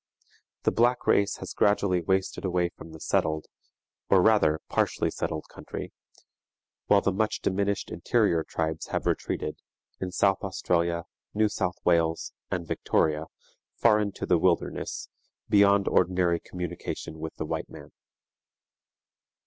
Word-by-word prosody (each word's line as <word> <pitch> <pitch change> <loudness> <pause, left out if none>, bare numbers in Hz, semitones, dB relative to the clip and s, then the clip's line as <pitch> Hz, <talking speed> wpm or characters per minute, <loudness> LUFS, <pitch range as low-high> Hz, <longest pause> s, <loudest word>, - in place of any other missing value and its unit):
The - - +3
black 120 +2 +2
race 100 0 +3
has - - -7
gradually 100 -3 +2
wasted 95 +2 0
away 90 -2 +1
from 80 -1 -13
the 80 - -10
settled, 80 0 0 0.6
or 95 - +6
rather 90 -6 +4
partially - - 0
settled 80 - -3
country, - - -8 0.9
while 100 -1 +5
the 100 - +1
much 110 +2 0
diminished 100 +1 -1
interior 80 -1 +2
tribes 80 0 -3
have - - -2
retreated, - - -2 0.4
in 95 -1 -3
South 95 +1 +2
Australia, 85 -3 0 0.3
New 110 +1 +4
South 90 -3 -1
Wales, 85 -2 +2 0.2
and 90 -2 -2
Victoria, 80 0 0 0.5
far 110 -2 +4
into 100 -2 -2
the 85 - +3
wilderness, 90 0 0 0.4
beyond 100 -1 +5
ordinary 90 -1 +2
communication 85 -3 -6
with 80 0 -6
the - - -4
white - - -3
man. - - -12
90 Hz, 130 wpm, -27 LUFS, 85-100 Hz, 0.9 s, or